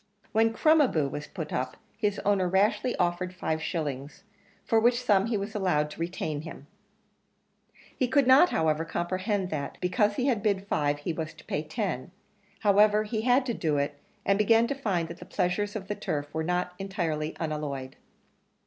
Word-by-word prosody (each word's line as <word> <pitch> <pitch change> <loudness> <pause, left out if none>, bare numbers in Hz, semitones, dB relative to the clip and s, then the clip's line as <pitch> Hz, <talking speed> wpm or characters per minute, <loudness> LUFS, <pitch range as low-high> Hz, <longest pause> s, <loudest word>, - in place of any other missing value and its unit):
When 225 +1 +3
Crom 310 +7 +4
a 285 - +5
boo 155 - 0
was 145 +2 -6
put 155 -1 -6
up 130 0 -2 0.2
his 210 -2 0
owner 200 -2 +3
rashly 205 +6 +2
offered 180 +1 -1
five 160 -3 -2
shillings 145 -4 -4 0.4
for 225 - +3
which 240 +2 +3
sum 205 -3 +3
he 230 -2 0
was 200 +2 -4
allowed 150 -8 +1
to - - -11
retain 160 -3 -3
him. 155 -3 -9 1.3
He 255 - +1
could 280 +1 +3
not, 265 +8 +7
however, 160 0 +1
comprehend 185 +3 -2
that, 145 -2 -4
because 205 +3 +1
he 250 - 0
had 245 -7 +1
bid 200 -2 0
five, 145 -6 0
he 145 +3 -3
was 160 -1 -5
to 160 - -16
pay 150 - -2
ten 160 - -3 0.5
however, 210 +1 +5
he 215 +1 -2
had 250 +3 +3
to 240 - -1
do 155 -8 0
it, 145 +1 -1 0.3
and 195 +1 +2
began 225 +2 +5
to - - +1
find 195 -12 -1
that 170 +1 -8
the - - -8
pleasures 205 +4 -1
of 195 -2 -5
the 210 - -1
turf 145 -7 -4
were 160 - -1
not 180 +1 -1
entirely 165 -6 -2
unalloyed. 145 -4 -4
185 Hz, 185 wpm, -28 LUFS, 155-215 Hz, 1.3 s, not